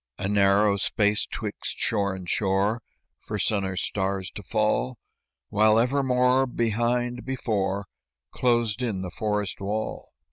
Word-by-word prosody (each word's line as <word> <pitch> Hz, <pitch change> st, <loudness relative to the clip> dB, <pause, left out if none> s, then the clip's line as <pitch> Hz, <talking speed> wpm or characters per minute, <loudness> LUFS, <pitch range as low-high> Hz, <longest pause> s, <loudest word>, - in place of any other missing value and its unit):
A 95 Hz, -, -2 dB
narrow 100 Hz, 0 st, +4 dB
space 105 Hz, +1 st, +1 dB
'twixt -, -, -5 dB
shore 100 Hz, -3 st, 0 dB
and 95 Hz, -2 st, -8 dB
shore, 100 Hz, +4 st, +1 dB, 0.4 s
For 105 Hz, -, -5 dB
sun 100 Hz, 0 st, +1 dB
or 95 Hz, 0 st, -3 dB
stars 95 Hz, 0 st, -2 dB
to -, -, -7 dB
fall, 110 Hz, +5 st, 0 dB, 0.5 s
While 110 Hz, +1 st, +4 dB
evermore, 125 Hz, +1 st, +3 dB
behind, 120 Hz, +1 st, 0 dB
before, 100 Hz, -6 st, -1 dB, 0.5 s
Closed 120 Hz, -2 st, +1 dB
in 105 Hz, -7 st, -2 dB
the 90 Hz, -, -5 dB
forest 105 Hz, -3 st, -2 dB
wall. 105 Hz, +2 st, -3 dB
105 Hz, 130 wpm, -26 LUFS, 100-120 Hz, 0.5 s, narrow